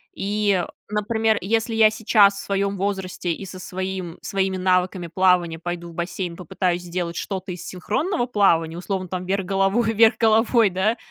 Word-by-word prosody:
И, 200 -3 0 0.2
например, 220 +1 +1
если 225 +3 -1
я 220 -1 +6
сейчас 210 -2 +4
в 200 - -7
своём 200 0 -1
возрасте 190 -3 -2
и 195 +4 -5
со 185 0 -9
своим 185 -2 -5
своими 190 -2 -1
навыками 185 -1 +1
плавания 175 -2 +2
пойду 175 0 -5
в - - -12
бассейн, 175 0 -4
попытаюсь 180 0 -2
сделать 175 -1 -4
что-то 190 0 -4
из 175 -1 -7
синхронного 240 - -2
плавания, 170 -8 +2
условно 185 0 -3
там, 185 0 -4
вверх 195 0 -1
головой 195 +4 +1
вверх 225 +1 +5
головой, 225 -1 +4
да, 210 +6 0
190 Hz, 160 wpm, -22 LUFS, 180-210 Hz, 0.2 s, я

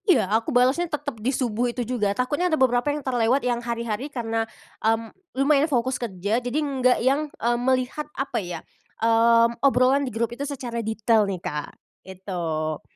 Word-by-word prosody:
Iya 355 - +5
aku 225 +1 +1
balesnya 260 +8 +2
tetep 285 -7 -4
di 235 - 0
subuh 245 -2 0
itu 240 0 -3
juga 230 -4 0
takutnya 290 +8 0
ada 315 - +1
beberapa 250 0 +2
yang 290 -1 -3
terlewat 250 +1 +2
yang 240 -1 0
hari-hari 235 +2 -3
karena, 225 -4 -2 0.3
mmm, 225 0 0 0.2
lumayan 285 +2 +3
fokus 255 -1 0
kerja 205 +1 -1
jadi 245 +3 -3
nggak 265 -4 +2
yang, 290 +3 +2
eee, 240 -3 -1
melihat 260 +4 0
apa 270 +1 -1
ya, 175 -3 -5 0.4
mmm, 230 +1 +4
obrolan 265 0 +4
di 275 - -2
grup 230 +1 -1
itu 250 - -8
secara 245 -4 -4
detail 220 -1 +2
nih, 190 - -2
Kak, 150 -3 -4 0.3
gitu. 170 -5 -4
240 Hz, 170 wpm, -24 LUFS, 225-270 Hz, 0.4 s, Iya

